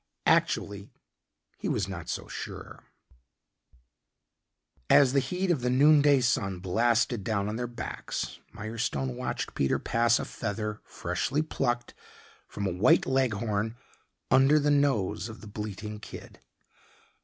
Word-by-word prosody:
Actually 100 0 +1 0.7
he - - -2
was - - 0
not - - -7
so - - -4
sure.... - - -8 2.0
As 135 -2 +6
the 140 - +4
heat 180 +8 -1
of 150 -7 0
the 125 - 0
noon 145 +4 +6
day 140 -2 +5
sun 100 -6 0
blasted 115 +4 +1
down 100 -1 -1
on 105 - -3
their 120 +1 -2
backs, 120 -1 -5
Mirestone 110 - -3
watched - - -4
Peter 70 - +1
pass 115 +1 +2
a - - -3
feather, 105 -1 -4
freshly 145 +4 -2
plucked 120 -6 -2 0.5
from 100 - -5
a 95 - 0
white 90 +4 +4
Leghorn, 115 -4 0 0.6
under 135 +3 +6
the 145 0 +2
nose 120 -7 +1
of 110 - -10
the 110 - -10
bleating 105 0 -6
kid. - - -11
115 Hz, 130 wpm, -28 LUFS, 105-130 Hz, 2.0 s, As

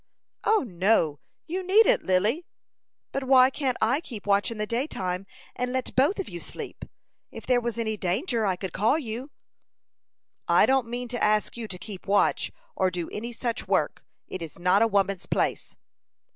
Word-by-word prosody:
"O, 435 -4 +4
no, 175 -6 +2 0.3
you 360 +4 -3
needn't, 430 +7 +5
Lily." 210 - +1 0.6
"But 275 -1 -3
why 260 0 +6
can't 265 -3 -1
I 250 +8 +2
keep 230 -10 -8
watch 200 -1 +2
in 230 - -6
the 210 - -1
daytime, 195 -6 -2 0.3
and 250 0 -2
let 260 0 -3
both 285 +10 +3
of 390 - -3
you 175 - -7
sleep? - - -8 0.5
If - - -10
there 250 -1 +3
was 235 -1 -3
any 220 -2 -1
danger 220 - -1
I 190 -3 +1
could 185 -1 -6
call 220 +9 +3
you." 250 -1 -5 1.2
"I - - +6
don't 265 -3 +2
mean 245 +1 -4
to 245 0 -3
ask 210 0 +2
you 235 -2 -5
to 185 - -6
keep 195 0 -8
watch, 200 +1 +2 0.2
or 190 -1 +2
do 175 -2 -4
any 235 +3 -5
such 235 0 -3
work. - - 0 0.2
It 185 - -6
is 165 -2 -7
not 180 +4 +3
a 230 - +5
woman's 200 -3 0
place." - - -1
225 Hz, 180 wpm, -26 LUFS, 195-260 Hz, 1.2 s, why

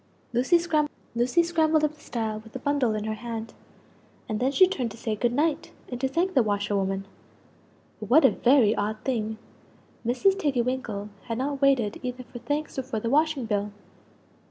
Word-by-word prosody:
Lucie 255 +9 +4
scrambled 315 0 +1
up 300 0 +1
the 305 - -22
stile 225 -6 -3
with 225 +1 -15
the - - -4
bundle 260 -4 +1
in 210 - -2
her 220 0 -2
hand; 225 0 -6 0.7
and 215 -1 -2
then 260 +3 +1
she 370 +6 +6
turned 260 -11 -2
to 215 - -11
say 220 -1 -2
"Good 235 +3 +1
night," 295 +4 0 0.2
and 245 -1 -5
to 265 - +2
thank 345 +8 0
the 260 - +5
washer 205 -1 0
woman 195 0 -1 0.9
But 215 -2 -7
what 280 +4 +6
a - - +7
very 245 -4 +4
odd 210 +1 -1
thing! 220 -4 -2 0.7
Mrs. 370 +12 +2
Tiggy 275 -8 +1
winkle 235 -5 -3 0.2
had 230 -2 -3
not 275 +2 -2
waited 260 -7 +2
either 255 0 -5
for 240 0 -10
thanks 290 +2 -3
or - - +1
for 230 -3 -4
the 230 +2 -2
washing 300 -3 +2
bill! 205 -1 -1
250 Hz, 185 wpm, -26 LUFS, 220-290 Hz, 0.9 s, a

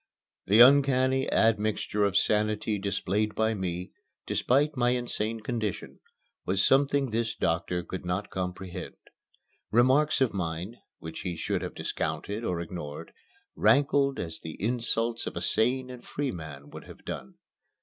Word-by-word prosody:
The 105 +4 +6
uncanny 130 0 +5
admixture 110 -1 +1
of 100 -1 +2
sanity 105 0 +1
displayed 100 +2 -1
by 110 0 +1
me, 90 -3 -4 0.3
despite 145 +4 +2
my 120 -1 +2
insane 115 -2 -3
condition, 110 -3 -4 0.4
was 95 +1 +2
something 140 -1 +3
this 115 +1 -1
doctor 90 +1 -1
could 95 +1 -6
not 90 +3 -3
comprehend. 90 -1 -5 0.7
Remarks 130 +6 +4
of 130 -4 +2
mine, 90 +4 -4 0.2
which 80 0 -8
he 90 -3 -4
should - - -2
have - - -5
discounted 105 +3 -3
or 90 -6 -1
ignored, 80 -2 -7 0.4
rankled 140 -1 +3
as 80 -2 -5
the 80 - -8
insults 115 +1 -1
of - - -5
a - - -2
sane 125 +3 +1
and 125 -1 -10
free 140 -2 -3
man 75 -4 -9
would - - -10
have - - -14
done. 65 - -6
110 Hz, 140 wpm, -28 LUFS, 90-125 Hz, 0.7 s, The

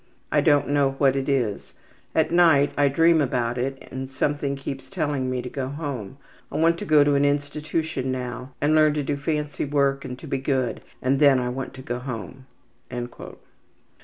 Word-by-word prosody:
I - - +4
don't 145 -1 +3
know 140 -2 +2
what 135 -2 +3
it 135 +1 -1
is. 120 -7 -1 0.4
At 160 0 +2
night 165 -5 +5
I 145 - +4
dream 165 +3 +4
about 125 -3 -1
it 135 +2 -4
and 130 0 -5
something 140 +1 -1
keeps 135 0 -7
telling 145 -8 -1
me 125 -1 -2
to - - -5
go 130 -1 -3
home. 135 -6 -5 0.3
I - - -3
want 165 +1 +3
to - - -5
go 155 -2 +6
to 145 0 +2
an 140 0 +3
institution 145 -1 -1
now 125 0 -5
and 150 +2 +2
learn 155 -1 +4
to 150 - -1
do 140 +1 -1
fancy 150 0 -2
work 140 -1 +1
and 125 - -6
to - - -11
be 135 - -2
good, 130 -2 -1 0.2
and 135 +2 +2
then 140 -3 +6
I 125 0 -1
want 130 +1 -5
to 130 - -10
go 120 -1 -3
home.'' 125 +1 -7
140 Hz, 190 wpm, -24 LUFS, 130-145 Hz, 0.4 s, go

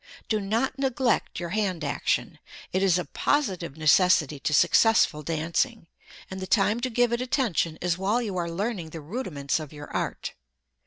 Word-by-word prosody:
Do 215 - +1
not 230 +7 -1
neglect 260 -3 0
your 175 -1 -4
hand 190 -4 -1
action. 140 - -1 0.3
It 185 - +1
is 190 -3 +4
a 180 - -2
positive 185 - -1
necessity 155 -2 +4
to 145 - -2
successful 175 - +4
dancing, 165 - -1 0.5
and 190 - -5
the 190 - -5
time 210 +2 +2
to 255 +1 -1
give 245 0 +2
it 235 - 0
attention 230 - 0
is 175 0 0
while 205 +5 +1
you 215 -6 -3
are 170 -2 -2
learning 185 -1 -3
the 160 - -8
rudiments 155 - -3
of 155 -3 -8
your 145 -1 -10
art. - - -3
185 Hz, 170 wpm, -26 LUFS, 165-230 Hz, 0.5 s, is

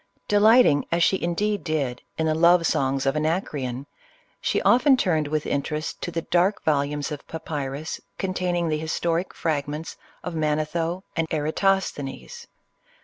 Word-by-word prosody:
De 205 - +3
lighting, 220 - +6
as 170 0 +3
she 190 - +2
indeed 205 +4 -1
did, 140 -7 -2 0.2
in 160 - 0
the 155 - +2
love 170 +2 +5
songs 135 -2 +1
of 135 +2 +1
Anac 160 +5 0
reon, 130 -1 -4 0.6
she - - +1
often 260 +2 +5
turned 160 - +1
with 155 0 -1
interest 150 +3 -3
to - - -3
the 165 -1 -3
dark 180 +4 +1
vol 150 -3 +3
umes 145 +1 -4
of 150 - -7
papyrus 150 -2 -5 0.2
containing 180 -2 -1
the 155 -1 0
historic 165 +3 -1
fragments 150 0 -3 0.3
of 180 - -4
Manetho 160 +3 -1
and 165 -1 0
Eratosthenes. 165 - -1
160 Hz, 150 wpm, -24 LUFS, 150-180 Hz, 0.6 s, lighting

